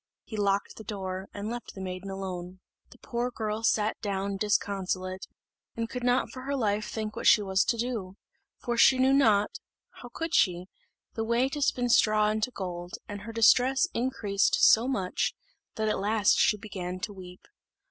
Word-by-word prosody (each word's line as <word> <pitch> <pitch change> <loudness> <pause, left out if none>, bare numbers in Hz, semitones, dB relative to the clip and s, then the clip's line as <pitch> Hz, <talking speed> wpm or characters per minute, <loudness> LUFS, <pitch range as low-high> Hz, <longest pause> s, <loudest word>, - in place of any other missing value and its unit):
He 220 - -8
locked 200 -1 0
the 220 - -9
door, 190 -2 -5
and 205 +1 -6
left 240 0 -7
the - - -8
maiden 185 +1 -6
alone. 185 -1 -6 0.3
The - - -17
poor 240 0 -3
girl 220 -2 -3
sat 215 -1 +1
down 200 -1 -2
disconsolate, 190 -2 -1 0.5
and 230 0 -2
could 250 +1 -6
not 245 +1 +1
for 255 - -8
her 280 +2 -3
life 210 -4 -1
think 215 -1 -4
what - - -1
she 210 - +6
was 190 -1 +2
to 235 - 0
do; 225 -6 -3 0.4
for 240 -1 -3
she 260 +2 +6
knew 260 +1 +4
not 215 -7 +3 0.4
how 245 - -9
could 325 +5 -4
she? 180 -2 +2 0.5
the 225 - -2
way 235 +3 +2
to 290 +1 -5
spin 245 -3 +1
straw 215 -2 +4
into 215 +2 -1
gold; 180 -4 -6
and 205 -1 -7
her 225 +2 -7
distress 250 +5 +4
increased 225 -5 +1
so 230 +3 +6
much 195 -9 -1 0.4
that 220 0 -1
at 215 - 0
last 205 +1 +3
she 210 - +4
began 185 -3 -6
to 205 - -4
weep. 180 -1 -12
210 Hz, 180 wpm, -28 LUFS, 195-235 Hz, 0.5 s, she